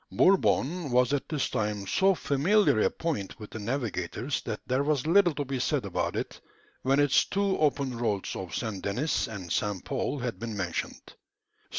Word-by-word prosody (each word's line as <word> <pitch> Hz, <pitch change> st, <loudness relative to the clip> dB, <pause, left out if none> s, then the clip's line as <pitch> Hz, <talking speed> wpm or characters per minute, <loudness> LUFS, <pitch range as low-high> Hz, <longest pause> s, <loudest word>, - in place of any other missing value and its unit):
Bourbon 180 Hz, -4 st, +3 dB
was 125 Hz, +1 st, +3 dB
at 145 Hz, -, -1 dB
this 150 Hz, -4 st, 0 dB
time 105 Hz, -2 st, -1 dB
so 190 Hz, -, +3 dB
familiar 165 Hz, -, +3 dB
a -, -, +4 dB
point 130 Hz, -, -4 dB
with 105 Hz, -, -9 dB
the 110 Hz, -, -6 dB
navigators 120 Hz, +1 st, -2 dB
that -, -, -4 dB
there 130 Hz, +2 st, +1 dB
was 145 Hz, -2 st, 0 dB
little 175 Hz, -1 st, +4 dB
to 145 Hz, 0 st, -2 dB
be 135 Hz, -1 st, -3 dB
said -, -, 0 dB
about -, -, -2 dB
it, -, -, -4 dB, 0.4 s
when 135 Hz, +2 st, +2 dB
its 145 Hz, -2 st, +4 dB
two 200 Hz, -1 st, 0 dB
open 140 Hz, -4 st, +1 dB
roads 110 Hz, -5 st, -1 dB
of 90 Hz, -4 st, -5 dB
St. 110 Hz, -4 st, -3 dB
Denis 125 Hz, +11 st, 0 dB
and 95 Hz, -6 st, -7 dB
St. 105 Hz, -3 st, -1 dB
Paul 140 Hz, +1 st, -2 dB
had 120 Hz, -3 st, -4 dB
been 115 Hz, -2 st, -5 dB
mentioned. 90 Hz, -3 st, -3 dB
130 Hz, 180 wpm, -28 LUFS, 105-150 Hz, 0.4 s, a